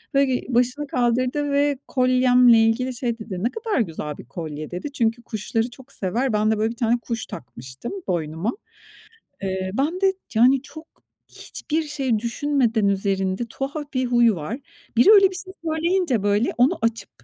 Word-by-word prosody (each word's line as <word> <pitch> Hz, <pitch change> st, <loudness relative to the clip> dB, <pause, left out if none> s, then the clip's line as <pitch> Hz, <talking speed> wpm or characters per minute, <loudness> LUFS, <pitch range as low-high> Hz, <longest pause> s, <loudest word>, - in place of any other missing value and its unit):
Ve 275 Hz, 0 st, +5 dB
ge 255 Hz, -2 st, 0 dB
başını 250 Hz, +4 st, +1 dB
kaldırdı 255 Hz, +4 st, 0 dB
ve 285 Hz, 0 st, +2 dB
kolyemle 250 Hz, -2 st, +5 dB
ilgili 225 Hz, +3 st, +2 dB
şey 235 Hz, -2 st, -2 dB
dedi, 200 Hz, -4 st, -6 dB
"Ne 235 Hz, -, +2 dB
kadar 450 Hz, -, -2 dB
güzel 160 Hz, -8 st, -3 dB
bir -, -, -11 dB
kolye." 155 Hz, +2 st, -7 dB
dedi. 180 Hz, +11 st, -5 dB
Çünkü 235 Hz, -3 st, 0 dB
kuşları 225 Hz, +1 st, -2 dB
çok 265 Hz, +3 st, -15 dB
sever. 230 Hz, +5 st, -1 dB
Ben 215 Hz, +1 st, +2 dB
de, 220 Hz, -, +1 dB
böyle, 220 Hz, +1 st, 0 dB
bir -, -, -8 dB
tane 235 Hz, +1 st, +1 dB
kuş 230 Hz, -1 st, -4 dB
takmıştım 130 Hz, -, -9 dB
boynuma. 165 Hz, +4 st, -1 dB, 0.9 s
Eee, 190 Hz, -1 st, -2 dB
ben 310 Hz, -, -1 dB
de, 385 Hz, -1 st, +4 dB, 0.2 s
yani, 255 Hz, +3 st, +5 dB
çok 315 Hz, +3 st, -12 dB, 0.4 s
hiçbir 320 Hz, +1 st, -4 dB
şey 270 Hz, -7 st, -1 dB
düşünmeden 235 Hz, -2 st, +1 dB
üzerinde, 195 Hz, +2 st, 0 dB
tuhaf 290 Hz, +2 st, -5 dB
bir 255 Hz, -1 st, 0 dB
huy 240 Hz, -1 st, +4 dB
var. 205 Hz, -, -4 dB, 0.4 s
Biri 385 Hz, -, +7 dB
öyle 395 Hz, -2 st, +7 dB
bir 370 Hz, -, -7 dB
şey 375 Hz, +1 st, -8 dB
söyleyince, 320 Hz, -, +1 dB
böyle, 205 Hz, +3 st, +2 dB
onu 270 Hz, +8 st, +3 dB
açıp 230 Hz, 0 st, -1 dB
240 Hz, 165 wpm, -23 LUFS, 210-280 Hz, 0.9 s, Biri